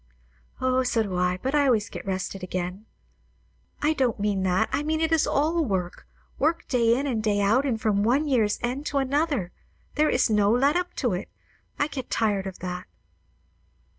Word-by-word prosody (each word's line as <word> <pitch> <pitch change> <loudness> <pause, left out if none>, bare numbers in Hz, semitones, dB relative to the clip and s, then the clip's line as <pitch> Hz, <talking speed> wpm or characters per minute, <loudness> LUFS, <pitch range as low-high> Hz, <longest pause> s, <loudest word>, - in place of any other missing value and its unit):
"O, 255 0 +2
so 245 -3 +1
do 195 -3 -4
I; 180 0 +1
but 265 - -1
I 290 -1 +3
always 225 -4 +2
get - - -9
rested 190 0 -3
again." 185 +3 -4 1.0
"I 305 +1 +3
don't 255 -7 0
mean 200 -1 0
that. 190 +3 +2
I - - 0
mean 315 +1 -1
it 320 0 0
is 320 -2 +3
all 320 +4 +1
work, 190 - -3 0.3
work; 320 +4 0
day 235 -2 +3
in 275 - -1
and 240 -6 -1
day 210 -2 +1
out, 225 +8 +3
and 230 -4 -1
from 210 -2 +1
one 260 +8 +2
year's 225 -7 +2
end 260 +5 -2
to 285 - -1
another. 275 - 0 0.4
There 305 +1 +2
is - - +3
no 210 -2 +3
let 270 +7 +3
up 360 0 -2
to 245 -7 0
it. 180 - -4 0.5
I 290 - +2
get 270 -4 -6
tired 205 -3 0
of 190 - -7
that." 180 0 -5
235 Hz, 195 wpm, -25 LUFS, 200-285 Hz, 1.0 s, I